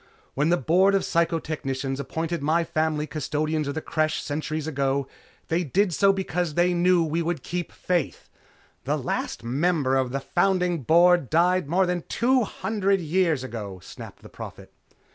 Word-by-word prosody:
When 150 +4 +1
the 175 - +3
Board 185 +8 +3
of 195 - +1
Psychotechnicians 150 -5 -1
appointed 165 +4 -3
my 160 +4 +2
family 155 -2 -1
custodians 155 0 -2
of 140 - -3
the 160 - -4
Creche 155 -1 0
centuries 155 +1 -3
ago, 140 -2 -1 0.4
they 170 +2 0
did 180 +5 +1
so 200 +4 +4
because 180 -4 -2
they 175 +1 +3
knew 175 0 +3
we 160 +1 -1
would 170 0 -2
keep 175 0 -4
faith 175 -5 -2 0.3
" - - -34
"The - - 0
last - - -3
member 140 +2 +1
of 130 -1 +1
the 135 - -1
founding 180 +1 +1
Board 170 +1 +4
died 175 -1 +2
more 185 +3 +3
than 180 -1 -2
two 255 +2 +2
hundred 200 -2 0
years 165 -4 +1
ago," 105 -7 -6
snapped - - -11
the - - -12
Prophet. - - -10
165 Hz, 165 wpm, -25 LUFS, 145-180 Hz, 0.4 s, so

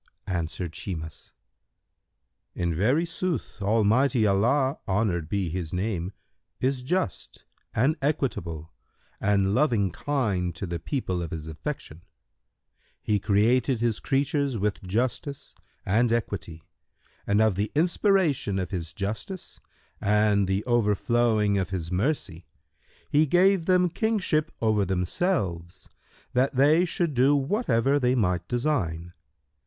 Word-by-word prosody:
Answered 85 -1 -3
Shimas, 80 -5 -6 1.2
"In 85 -1 -1
very 125 - +2
sooth 170 -8 -3
Almighty 110 +4 +3
Allah 125 +8 +2
(honoured 95 -6 0
be 100 -3 -1
His 85 -1 -4
name!) 90 -1 -2 0.5
is 130 0 0
just 130 - -3 0.3
and 135 +8 +3
equitable 85 - -2 0.5
and 100 -1 +2
loving 115 - +2
kind 100 - -1
to 80 - -4
the 85 -1 -4
people 95 - -2
of 85 - -4
His 80 -1 -6
affection.[FN#129] 80 +1 -6 1.0
He 105 -1 +1
created 115 +5 +2
His 115 -2 0
creatures 140 -2 0
with 105 0 -1
justice 120 +8 -3 0.3
and 115 +4 +2
equity 100 -8 -3 0.6
and 100 +1 +3
of 110 -2 +4
the 100 +3 -2
inspiration 170 - +2
of 95 +1 -3
His 85 -4 -4
justice 105 - -5 0.4
and 105 -1 +3
the 95 +2 0
overflowing 110 -2 +2
of 95 - -2
His 90 -3 -4
mercy, 95 - -2 0.6
He 150 +2 +3
gave 185 +2 +4
them 180 -1 +4
kingship 175 -6 0
over 110 -2 +3
themselves, 90 - -2 0.5
that 130 +2 +1
they 150 +7 +5
should 170 -2 -1
do 135 +3 +4
whatever 140 - +1
they 125 -1 +2
might 90 -7 0
design. 90 - -1
110 Hz, 120 wpm, -26 LUFS, 90-140 Hz, 1.2 s, they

